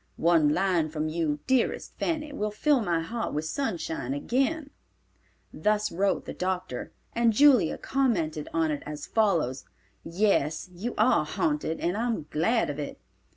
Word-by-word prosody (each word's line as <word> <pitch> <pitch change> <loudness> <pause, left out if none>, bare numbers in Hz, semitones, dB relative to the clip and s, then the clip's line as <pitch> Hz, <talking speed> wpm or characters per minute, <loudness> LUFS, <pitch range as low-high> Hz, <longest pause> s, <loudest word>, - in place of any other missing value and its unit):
One 165 -3 +4
line 175 -2 +1
from 155 0 -2
you, 155 -2 -1
dearest 260 -2 0
Fanny, 305 -3 -2
will 215 -6 -1
fill 265 +6 +2
my 170 -5 0
heart 225 +5 -3
with 150 +1 -1
sunshine 160 - -2
again—" 275 - -1 0.8
Thus 210 0 +1
wrote 195 +3 0
the - - -6
doctor, 180 -8 -3 0.2
and 235 0 +3
Julia 255 - +5
commented 170 - 0
on 160 -1 +1
it 145 - -3
as 150 0 -6
follows: 165 - +1 0.4
"Yes, 170 -3 +1
you 215 +8 -4
are 220 +4 +4
haunted, 295 - -1
and 175 +2 0
I 230 +3 -1
am 225 -10 -2
glad 220 +4 +1
of 145 - -7
it. 145 - -5
185 Hz, 155 wpm, -27 LUFS, 155-235 Hz, 0.8 s, Julia